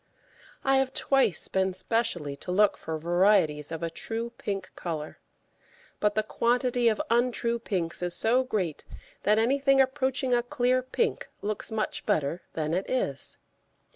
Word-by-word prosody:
I 270 0 +4
have 265 0 0
twice 260 - +2
been 190 -1 0
specially 185 -8 0
to 180 - -6
look 205 +3 +4
for 160 0 -5
varieties 170 -3 +2
of 165 0 -4
a 165 - -2
true 230 +7 -4
pink 200 -4 -5
colour, 155 -3 -5 0.8
but 210 0 +1
the 215 - +2
quantity 245 +2 +1
of 215 - -1
untrue 235 0 +1
pinks 180 -8 -1
is 175 -1 0
so 245 +4 +3
great 195 - -2 0.4
that 210 +2 +3
anything 275 +4 +3
approaching 265 -1 +1
a 240 - +4
clear 250 0 +1
pink 355 - -1
looks 210 +1 -2
much 220 -1 -2
better 165 -4 0
than 155 0 -2
it 185 +3 -1
is. 140 - -2
215 Hz, 150 wpm, -28 LUFS, 175-250 Hz, 0.8 s, I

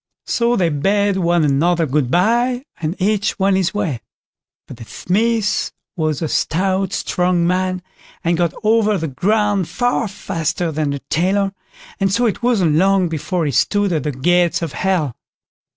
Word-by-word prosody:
So 235 0 +1
they 180 -6 +2
bade 195 +6 +1
one 175 -2 +2
another 165 +4 +2
"Good 140 -2 0
bye", 240 - +1
and 165 +4 -4
each 205 +1 0
went 195 -1 +2
his 190 -2 +1
way; 185 - -2 0.7
but - - -10
the 115 - -9
Smith 215 - 0 0.2
was 155 -2 -1
a - - 0
stout, 190 +5 0
strong 180 -1 0
man, 185 0 0 0.4
and 170 +1 +1
got 170 -1 +1
over 215 -1 +3
the 160 -2 -3
ground 205 +5 0
far 245 -2 0
faster 170 -4 -3
than 155 -1 -1
the 140 -1 -3
tailor, 195 +4 +1 0.5
and 195 -1 +1
so 240 +5 +2
it 220 - -1
wasn't 195 -11 +2
long 190 0 +3
before 165 +2 -2
he 145 - 0
stood 205 - +1
at 155 - 0
the 150 - -2
gates 175 +6 +1
of 160 - -4
Hell. 175 -9 -1
180 Hz, 165 wpm, -18 LUFS, 160-205 Hz, 0.7 s, over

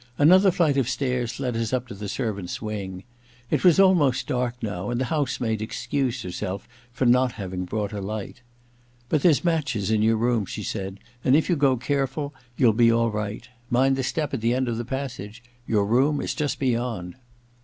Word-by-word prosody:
Another 185 +7 +6
flight 170 -6 +2
of 130 -3 +1
stairs 125 -2 -2
led 125 -3 -2
us 115 -1 -1
up 130 -1 -1
to - - -8
the 100 0 -6
servants' 100 -6 -3
wing. 100 -4 -5 0.5
It - - +1
was 180 -1 +6
almost 155 -10 +4
dark 125 -4 -1
now, 100 -2 -3
and 120 0 -1
the 130 - 0
house 150 -3 0
maid 110 -3 -1
excused 125 +3 -2
herself 95 +2 -5 0.2
for 125 +2 -1
not 125 0 +4
having 95 -3 -5
brought 105 +2 -3
a 100 - -4
light. 105 +4 -5 0.3
' 120 0 -34
But 150 - +2
there's 160 -1 +4
matches 135 - 0
in 110 -1 +2
your 110 +1 +3
room,' 115 -3 +1
she - - -5
said, 95 -2 -4
^ - - -20 0.2
and 130 - +4
if 160 - +2
you - - +4
go 140 -3 +3
care 135 +3 0
ful 145 +1 -5 0.2
you'll 120 -5 +5
be 115 +1 +5
all 115 0 +2
right. 105 +2 -4 0.2
Mind 135 +2 +3
the 135 - -1
step 145 +3 -2
at 130 - -2
the 115 +2 +2
end 130 0 0
of 115 -1 -1
the 120 - -3
passage. 120 -5 -5 0.2
Your 105 -3 +2
room 135 +7 +2
is - - -2
just 150 -3 -2
beyond. 120 -8 -1
120 Hz, 210 wpm, -25 LUFS, 110-135 Hz, 0.5 s, Another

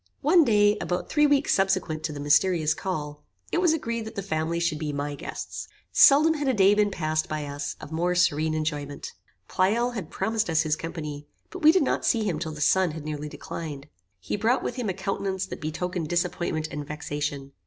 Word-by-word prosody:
One 330 +4 +5
day, 210 -4 +3
about 180 - -2
three 295 -1 +4
weeks 285 -1 +3
subsequent 190 -5 +1
to - - -2
the 145 - -7
mysterious 155 +2 +3
call, 150 -5 -5 0.3
it 345 - +1
was 350 -3 +4
agreed 230 -8 -2
that 220 - -8
the 200 - -3
family 165 -2 -1
should 170 -3 0
be 155 -2 -2
my 145 0 -3
guests. 145 - -6 0.2
Seldom 305 +3 +7
had 295 -3 -2
a 260 - +2
day 195 0 +5
been 210 0 +3
passed 155 -4 -1
by 155 -1 -3
us, 145 0 -5
of - - -10
more 175 +3 0
serene 155 -3 +2
enjoyment. 150 -2 -3 0.4
Pleyel 225 +6 +1
had 220 -5 -6
promised 220 -3 -1
us 160 0 +3
his 155 -1 +1
company, 150 -3 -6 0.2
but 370 - -8
we 310 0 +8
did 365 -2 +3
not - - 0
see 225 -2 +2
him 180 -7 -1
till 160 - -4
the 150 -1 -8
sun 185 +1 +3
had 155 -1 -7
nearly 150 -1 -4
declined. 145 -2 -7 0.3
He 90 - -3
brought 225 +5 +1
with 245 - -3
him 245 -5 -2
a 185 - -2
countenance 195 0 -2
that 190 - -8
betokened 165 +2 -3
disappointment 175 -2 -1
and 150 0 -4
vexation. 145 -1 -4
175 Hz, 205 wpm, -26 LUFS, 150-210 Hz, 0.4 s, we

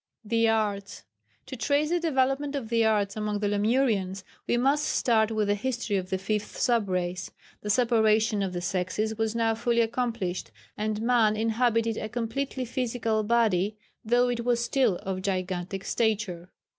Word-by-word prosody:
[Sidenote: 210 - -15
The 230 -1 +3
Arts.] 205 -3 -1 0.4
To 260 - -7
trace 285 +5 +1
the 350 - +2
development 280 -2 0
of 250 -6 -4
the 230 -1 +2
Arts 205 -2 +1
among 210 -1 -2
the 205 0 -1
Lemurians, 205 -3 +1 0.2
we 240 - +2
must 275 +4 +2
start 220 -6 +2
with 215 -2 0
the 205 - +3
history 230 0 -2
of 185 -1 -2
the 190 - 0
fifth 210 +2 -3
sub 235 -5 +1
race. 180 0 -2 0.3
The 210 - -5
separation 220 -2 +3
of 195 -2 -1
the 175 - -3
sexes 190 +4 -1
was 225 0 0
now 225 -1 +2
fully 235 +1 +1
accomplished, 225 -5 -2 0.3
and 215 +1 -2
man 230 -3 +3
inhabited 230 0 +1
a 215 - -4
completely 250 +3 -3
physical 230 -3 -1
body, 210 -3 +1 0.3
though 245 +2 +3
it 235 -1 -2
was 235 -1 +1
still 255 -7 +2
of 190 -1 -3
gigantic 185 0 -3
stature. 200 -7 -1
220 Hz, 170 wpm, -27 LUFS, 200-240 Hz, 0.4 s, The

